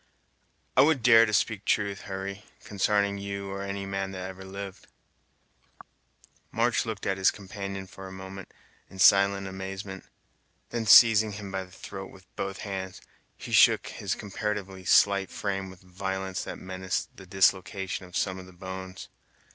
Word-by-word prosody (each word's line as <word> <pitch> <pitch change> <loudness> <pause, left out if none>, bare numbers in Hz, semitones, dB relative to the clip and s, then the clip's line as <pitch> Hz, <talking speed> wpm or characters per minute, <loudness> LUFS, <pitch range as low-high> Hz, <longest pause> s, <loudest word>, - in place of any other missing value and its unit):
"I - - +7
would 145 -5 +3
dare 115 -2 +7
to - - -2
speak 105 -1 +1
truth, 100 -1 -1
Hurry, 100 +1 -5 0.2
consarning 100 0 +1
you 100 0 -5
or 100 0 -4
any 100 0 -4
man 95 0 -3
that 95 0 -5
ever 95 0 -11
lived." 95 0 -8 1.6
March 115 0 +1
looked 110 -3 -4
at 95 -1 0
his 95 - +5
companion, 100 -1 -6
for 95 0 -10
a - - -10
moment, 95 0 -9 0.4
in 95 - -13
silent 100 +1 +5
amazement; 95 0 -6 0.7
then 115 -2 -2
seizing 110 -1 +8
him 100 -1 -7
by 95 -1 -2
the 90 - -20
throat 95 +1 -8
with 95 -1 -16
both 95 0 -4
hands, 95 -2 -5 0.4
he - - -9
shook - - +5
his - - -3
comparatively 100 -2 -4
slight 100 +1 +4
frame 95 -2 -3
with 95 0 -14
a - - -23
violence 95 +1 -4
that - - -6
menaced 95 0 -4
the 95 - -13
dislocation 95 0 +1
of 90 - -5
some 95 -1 -1
of 90 - -11
the 95 - -14
bones. 95 +1 -8
95 Hz, 165 wpm, -28 LUFS, 95-100 Hz, 1.6 s, seizing